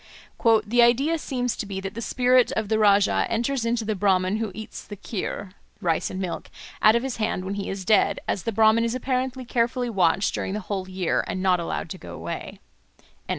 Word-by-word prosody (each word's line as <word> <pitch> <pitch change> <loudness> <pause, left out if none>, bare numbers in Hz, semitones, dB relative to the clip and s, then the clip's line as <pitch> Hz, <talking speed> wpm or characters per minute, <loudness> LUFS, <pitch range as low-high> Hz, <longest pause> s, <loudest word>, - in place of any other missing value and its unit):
"The 240 +3 +3
idea 270 +8 +3
seems 250 -4 -2
to 210 - -5
be 195 -1 -4
that 195 0 -5
the 230 - -6
spirit 250 +1 +3
of 220 -2 -2
the 220 - +2
Rájá 205 -1 +4
enters 240 +2 -1
into 230 -1 0
the 215 - 0
Bráhman 190 0 +1
who 220 -3 -2
eats 220 0 -8
the 205 - -9
khir 200 -1 -5 0.3
(rice 170 +1 0
and 185 - -5
milk) 185 -3 -4 0.3
out 215 +1 +6
of 235 - +1
his 265 -2 -3
hand 215 -4 -1
when 195 - -3
he 200 -1 -4
is 195 -1 -5
dead, 215 +2 +3
as 195 - -1
the 230 - -2
Brahman 220 +2 +4
is 230 +1 -1
apparently 255 0 -2
carefully 240 +1 0
watched 190 -1 +2
during 190 - -3
the - - -2
whole 190 -1 -4
year, 185 -2 0
and 185 - -3
not 185 -2 +3
allowed 170 - -4
to - - -6
go - - -9
away." - - -6
215 Hz, 210 wpm, -24 LUFS, 195-240 Hz, 0.3 s, out